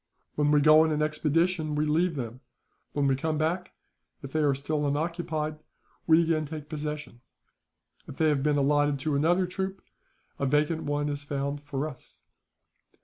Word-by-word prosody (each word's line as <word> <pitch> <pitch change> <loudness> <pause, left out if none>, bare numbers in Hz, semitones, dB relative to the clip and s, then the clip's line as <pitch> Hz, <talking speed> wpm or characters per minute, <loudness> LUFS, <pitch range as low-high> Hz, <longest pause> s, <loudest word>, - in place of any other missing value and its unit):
When 145 0 +1
we 150 0 +4
go 155 +1 +7
on 160 - +1
an 150 0 +1
expedition, 155 +1 0
we 150 +1 +1
leave 165 +3 +1
them; 120 -1 -5 0.5
when 145 -1 +1
we 135 -1 +3
come 155 +3 -1
back, 170 +4 -1 0.5
if 135 - -7
they 155 - 0
are 145 -3 +3
still 145 +2 -1
unoccupied, 155 0 -2 0.5
we 165 +1 +6
again 160 -2 0
take 150 -1 -7
possession. 150 -5 -5 0.9
If - - -9
they 160 -1 +3
have 145 -2 +1
been 150 +1 +2
allotted 145 0 +2
to 150 0 0
another 175 +6 +3
troop, 190 +2 -4 0.6
a 140 - 0
vacant 150 +3 +1
one 145 0 -1
is 145 -1 -3
found 140 0 -3
for 145 0 -3
us. 130 -5 -13
150 Hz, 170 wpm, -28 LUFS, 145-160 Hz, 0.9 s, go